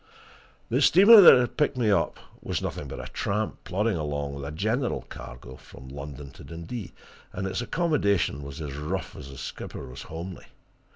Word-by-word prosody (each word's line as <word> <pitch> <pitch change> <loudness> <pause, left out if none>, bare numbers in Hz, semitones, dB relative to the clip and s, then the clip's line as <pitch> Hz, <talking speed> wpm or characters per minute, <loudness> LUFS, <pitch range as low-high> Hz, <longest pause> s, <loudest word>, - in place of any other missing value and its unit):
The 125 +5 +1
steamer 200 +9 +9
that 175 - +10
had 125 - -2
picked 145 -3 +1
me 115 -4 +2
up 100 - +1 0.2
was - - -2
nothing 70 - -5
but 70 - -7
a - - -8
tramp, 105 +2 -2
plodding 105 +2 0
along 75 -2 -3
with 70 0 -7
a 70 - -4
general 110 - -1
cargo 60 +1 -10
from 65 0 -13
London 70 0 -8
to - - -14
Dundee, 85 +6 -7 0.4
and 95 - -4
its 95 +3 -2
accommodation 120 - +1
was 70 +3 -8
as 75 -3 -5
rough 75 +6 -4
as 70 - -9
its 70 - -9
skipper - - -7
was 65 +1 -9
homely. 85 +3 -8
85 Hz, 180 wpm, -26 LUFS, 70-115 Hz, 0.4 s, that